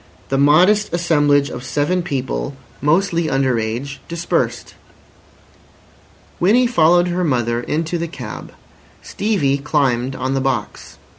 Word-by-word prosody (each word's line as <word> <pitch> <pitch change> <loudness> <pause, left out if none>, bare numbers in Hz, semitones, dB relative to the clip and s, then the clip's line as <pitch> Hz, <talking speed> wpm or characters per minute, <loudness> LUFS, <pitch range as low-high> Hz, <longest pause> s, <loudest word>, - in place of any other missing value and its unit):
The 135 - 0
modest 180 +9 +4
assemblage 145 -4 +2
of - - -7
seven 150 +7 0
people, 130 - -3 0.3
mostly 170 +2 +1
under 135 -3 +1
age, 120 +6 -4
dispersed. 165 -8 -2 1.7
Winnie 225 +8 +4
followed 175 -5 +3
her 180 +1 -1
mother 120 -6 0
into 165 +6 -2
the 170 - -2
cab. 165 - -8 0.5
Stevie 175 -10 0
climbed 135 -2 0
on 130 +1 -2
the 135 - 0
box. 130 -6 -3
145 Hz, 120 wpm, -19 LUFS, 130-175 Hz, 1.7 s, modest